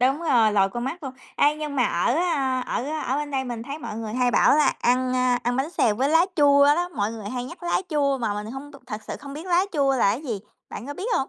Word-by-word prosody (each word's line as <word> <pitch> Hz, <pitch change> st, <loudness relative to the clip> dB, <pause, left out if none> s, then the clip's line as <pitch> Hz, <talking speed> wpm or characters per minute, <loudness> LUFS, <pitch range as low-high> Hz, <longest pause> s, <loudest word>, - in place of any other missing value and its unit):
Đúng 265 Hz, +4 st, +2 dB
rồi, 235 Hz, -9 st, +3 dB
lòi 195 Hz, -2 st, +3 dB
con 240 Hz, +4 st, -4 dB
mắt 325 Hz, +6 st, -5 dB
luôn. 265 Hz, -2 st, -5 dB, 0.2 s
Ê, 295 Hz, +1 st, +3 dB
nhưng 300 Hz, -2 st, -5 dB
mà 250 Hz, -, +3 dB
ở, 175 Hz, +8 st, +1 dB
à, 275 Hz, -6 st, 0 dB
ở 250 Hz, -, -3 dB, 0.2 s
ở 260 Hz, -, 0 dB
bên 295 Hz, 0 st, -3 dB
đây 265 Hz, -2 st, -1 dB
mình 240 Hz, -3 st, -5 dB
thấy 280 Hz, +5 st, -6 dB
mọi 215 Hz, -, -6 dB
người 220 Hz, -1 st, -5 dB
hay 250 Hz, 0 st, +2 dB
bảo 280 Hz, -, +4 dB
là 305 Hz, -, +4 dB
ăn, 255 Hz, +1 st, +2 dB
a, 250 Hz, -1 st, +2 dB
ăn 245 Hz, +1 st, -1 dB
bánh 270 Hz, +4 st, -1 dB
xèo 230 Hz, -10 st, +2 dB
với 260 Hz, +6 st, 0 dB
lá 325 Hz, +3 st, +4 dB
chua 285 Hz, -1 st, +6 dB
đó, 340 Hz, +5 st, +3 dB
mọi 220 Hz, -9 st, -2 dB
người 215 Hz, -3 st, -7 dB
hay 245 Hz, +2 st, -4 dB
nhắc 340 Hz, +8 st, -10 dB
lá 345 Hz, -, 0 dB
chua 280 Hz, -3 st, +1 dB
mà 225 Hz, -4 st, -1 dB
mình 210 Hz, +2 st, -5 dB
hông 275 Hz, +2 st, -8 dB
b 285 Hz, -, -18 dB
thật 215 Hz, -3 st, -5 dB
sự -, -, -4 dB
không 280 Hz, -1 st, -9 dB
biết 315 Hz, +5 st, -8 dB
lá 360 Hz, +1 st, +3 dB
chua 275 Hz, -4 st, +2 dB
là 200 Hz, -5 st, +3 dB
gì, 235 Hz, -6 st, -5 dB, 0.3 s
bạn 245 Hz, -, -7 dB
có 285 Hz, -, -6 dB
biết 375 Hz, +8 st, -5 dB
hông? 270 Hz, -, -1 dB
265 Hz, 280 wpm, -24 LUFS, 240-295 Hz, 0.3 s, chua